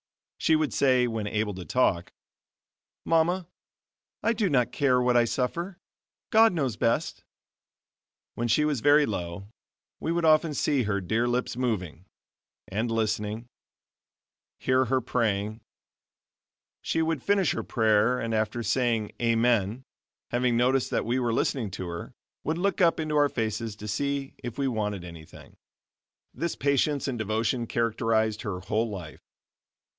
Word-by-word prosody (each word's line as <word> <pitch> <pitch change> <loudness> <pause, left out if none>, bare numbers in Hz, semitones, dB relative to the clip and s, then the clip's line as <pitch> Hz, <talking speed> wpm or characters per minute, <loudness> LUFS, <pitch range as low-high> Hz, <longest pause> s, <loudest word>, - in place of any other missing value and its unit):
She 160 - +3
would 155 -2 0
say, 130 -2 +3
when 110 -3 -3
able 105 0 -1
to 90 -1 -7
talk: 90 -6 +1 0.9
"Mama, 165 +2 +2 0.8
I 230 - +3
do 215 -4 0
not 125 -5 +2
care 130 -3 +2
what 125 0 +2
I 120 -1 +5
suffer, 170 - -2 0.5
God 225 +1 +6
knows 135 -9 -1
best." 115 +2 -1 1.1
When 120 - -2
she 150 +7 +3
was 145 -6 0
very 145 +2 +5
low, 95 -1 -5 0.5
we 160 - -2
would 170 0 0
often 155 -1 +4
see 140 -2 +1
her 100 -2 0
dear 110 +6 0
lips 125 0 -1
moving, 95 -9 -3 0.6
and 110 +5 -2
listening, 110 0 -1 1.1
hear 130 0 +2
her 130 +2 +1
praying. 110 -3 -1 1.2
She 160 - 0
would 160 -4 -1
finish 200 +1 +2
her - - -2
prayer 110 +2 +2
and 115 -2 -2
after 110 +2 -1
saying 115 -4 0
"Amen" 115 -1 +2 0.5
having 120 -1 +1
noticed 130 +2 +2
that - - -1
we 120 +3 0
were 120 -2 0
listening 115 -1 0
to 95 -1 -5
her, 85 0 -7 0.3
would 160 +2 -1
look 195 +2 0
up 170 -2 +4
into 155 -1 -2
our 145 -1 +4
faces 110 -2 -3
to 105 0 -9
see 140 +5 -2
if 120 0 -7
we 140 -1 0
wanted 105 -6 -2
anything. 85 -3 -12 0.8
This 170 0 -3
patience 140 +1 +1
and 125 -4 -3
devotion 110 +3 -1
characterized 110 -2 0
her 95 -3 -4
whole 110 +3 -1
life. 90 -7 -8
120 Hz, 145 wpm, -27 LUFS, 110-140 Hz, 1.2 s, God